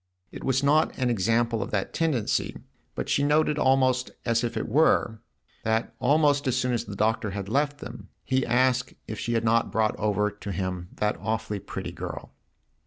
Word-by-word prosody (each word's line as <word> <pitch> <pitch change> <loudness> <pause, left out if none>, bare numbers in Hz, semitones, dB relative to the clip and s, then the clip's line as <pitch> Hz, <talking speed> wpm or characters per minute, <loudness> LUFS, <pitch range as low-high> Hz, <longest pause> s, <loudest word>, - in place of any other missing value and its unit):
It - - -9
was 135 +1 +1
not 150 +3 +3
an 125 -2 +1
example 115 +2 +1
of - - -3
that 100 -2 -2
tendency, 150 -10 0 0.4
but - - -3
she - - +2
noted 150 +1 +2
almost 130 -1 +3 0.2
as 115 0 +1
if 115 -1 -2
it - - -2
were 115 -5 +2 0.4
that 110 +1 0
almost 145 +1 +3
as 130 -1 +1
soon 125 -1 0
as 120 - -1
the 100 - -7
Doctor 110 0 +1
had 100 0 -5
left 145 +5 0
them 125 0 -9
he 130 0 +1
asked 125 +1 +1
if 110 -1 -5
she 120 - -2
had 115 -1 +1
not 115 +1 +2
brought 110 -1 +1
over 105 0 +1
to 105 -1 -7
him 90 -1 -3
that 105 0 0
awfully 110 +1 -2
pretty - - -6
girl. - - -7
115 Hz, 185 wpm, -26 LUFS, 105-130 Hz, 0.4 s, not